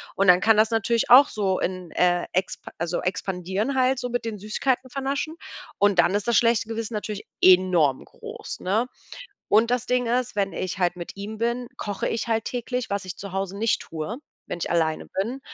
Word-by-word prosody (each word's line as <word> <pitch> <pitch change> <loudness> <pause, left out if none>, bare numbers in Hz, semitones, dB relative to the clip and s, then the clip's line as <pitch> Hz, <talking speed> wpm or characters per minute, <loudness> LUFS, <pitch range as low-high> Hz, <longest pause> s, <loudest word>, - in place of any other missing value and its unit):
Und 195 - +2
dann 180 0 +7
kann 220 -1 +4
das 220 +1 +4
natürlich 230 +1 +1
auch 270 +3 +9
so 195 -3 -1
in, 185 -2 -3
äh, 175 0 +2
expa 185 +1 -2
also, 170 +1 -1
expandieren 190 +6 -2
halt, 255 0 +2
so 250 - -3
mit 245 -1 -2
den 220 -2 -4
Süßigkeiten 250 +5 -1
vernaschen. 275 +4 -3 0.4
Und 200 -3 +3
dann 175 +3 +4
ist 205 +1 -2
das 235 -2 +4
schlechte 230 -1 +3
Gewissen 225 0 -4
natürlich 210 0 -4 0.2
enorm 180 -7 +5
groß, - - -9
ne? 215 +7 0 0.6
Und 225 +2 +4
das 250 0 0
Ding 250 -1 +1
ist, 245 -1 0
wenn 195 -1 +1
ich 185 0 -4
halt 175 -1 +1
mit 175 - -7
ihm 210 +2 -6
bin, 235 +2 -1
koche 205 -2 -3
ich 225 +1 -2
halt 225 -1 0
täglich, 250 0 -3
was 200 -1 -2
ich 180 - -6
zu 200 -2 -8
Hause 195 0 -3
nicht 225 +2 +1
tue, 165 +9 -5 0.3
wenn - - -5
ich - - -3
alleine 160 -2 0
bin. 230 +8 -3
210 Hz, 200 wpm, -24 LUFS, 185-235 Hz, 0.6 s, auch